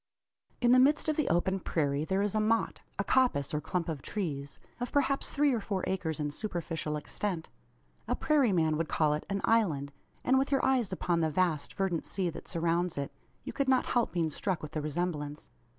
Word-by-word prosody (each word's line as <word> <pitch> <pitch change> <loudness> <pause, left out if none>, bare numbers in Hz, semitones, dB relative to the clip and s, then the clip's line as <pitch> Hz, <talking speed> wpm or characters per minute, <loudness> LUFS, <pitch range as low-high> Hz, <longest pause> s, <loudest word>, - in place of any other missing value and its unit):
In 240 -1 +4
the 255 - +7
midst 295 +4 +4
of 310 - +1
the 305 - 0
open, 190 +3 +1
prairie 145 -4 0
there 190 +3 +1
is 205 - 0
a 215 - +2
"motte" 225 +2 +1 0.2
a - - 0
coppice, 245 - +2
or 150 - 0
clump 170 +2 -2
of 155 -5 -3
trees 145 -9 -3 0.2
of 245 0 -3
perhaps 275 -1 +2
three 285 -1 +3
or 235 - +1
four 200 -3 -3
acres 165 -4 -2
in 145 -1 -1
superficial 165 -4 -3
extent. 170 +2 -3 0.6
A - - +1
prairie 285 -7 +3
man 160 -4 +2
would 165 0 -2
call 155 -2 +2
it 150 - -4
an 200 0 -1
"island," 160 -12 +2 0.3
and 260 +1 +4
with 270 +1 0
your 275 - +2
eyes 255 -6 +2
upon 175 -2 0
the 160 -1 +2
vast 155 -2 0
verdant 190 -4 -1
sea 185 -3 -1
that - - -10
surrounds 170 0 0
it, 140 -1 -3 0.3
you - - -6
could 275 -1 0
not 260 -1 +4
help 240 -1 +2
being 165 -2 0
struck 180 +2 -2
with 150 - -6
the 155 - -2
resemblance. 150 -1 -3
180 Hz, 210 wpm, -31 LUFS, 155-230 Hz, 0.6 s, the